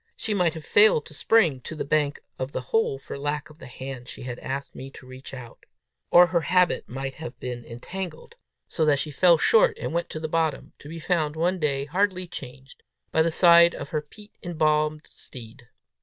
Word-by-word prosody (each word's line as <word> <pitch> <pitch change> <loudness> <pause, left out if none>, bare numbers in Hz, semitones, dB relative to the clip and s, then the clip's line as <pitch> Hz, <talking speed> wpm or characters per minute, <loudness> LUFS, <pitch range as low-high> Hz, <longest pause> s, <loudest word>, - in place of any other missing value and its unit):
She 220 - -3
might 175 -5 +1
have 160 - -8
failed 205 -8 +5
to 155 - -13
spring 160 - +2
to 160 - -7
the 155 - -4
bank 145 0 0 0.2
of 130 +2 -4
the - - -2
hole 225 -11 +2
for 140 - -8
lack 145 +1 -3
of 155 - -19
the - - -10
hand 130 -1 -8
she - - -8
had 125 -1 -6
asked 135 +1 -5
me 135 - -8
to 135 - -14
reach 130 +1 -11
out! 125 -4 -11 0.4
Or 175 +1 +8
her 170 -1 0
habit 180 +3 +1
might 135 +2 -5
have 160 +2 -9
been 125 -1 -5
entangled, 190 - -8 0.3
so 160 - -1
that 145 -2 +3
she 150 +2 -4
fell 170 +3 +5
short, 465 - +4
and 160 - -4
went 170 0 -1
to 155 - -6
the 160 - -3
bottom 160 -2 -1
to 145 - -12
be 165 +1 -7
found, 160 -2 0
one 175 +3 0
day, 140 -3 0
hardly 185 +3 0
changed, 135 -6 -10 0.3
by 160 - +3
the 165 +1 +2
side 170 0 +6
of - - -7
her 155 -3 -1
peat 205 +8 -16
embalmed 155 -2 0
steed! 120 0 -12
155 Hz, 210 wpm, -25 LUFS, 135-175 Hz, 0.4 s, Or